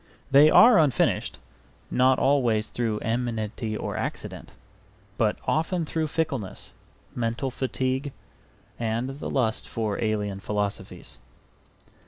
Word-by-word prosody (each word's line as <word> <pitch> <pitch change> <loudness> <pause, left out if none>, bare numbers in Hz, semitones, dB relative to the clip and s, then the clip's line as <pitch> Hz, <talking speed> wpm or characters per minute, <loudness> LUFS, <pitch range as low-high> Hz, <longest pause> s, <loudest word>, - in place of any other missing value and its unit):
They 145 +3 +8
are 230 +1 +7
unfinished, 145 -6 +1 0.5
not 130 +1 +4
always 120 -6 +2
through 115 -3 -2
enmity 115 -1 -2
or - - -4
accident, - - -5 0.6
but - - +1
often 165 +2 0
through 160 0 -1
fickleness, 135 - -3 0.4
mental 115 +2 -2
fatigue, 130 +2 -2 0.7
and 120 +5 -2
the - - -4
lust 115 -5 -1
for 110 -1 -2
alien 105 -3 -1
philosophies. 100 -10 -4
120 Hz, 105 wpm, -26 LUFS, 110-140 Hz, 0.7 s, They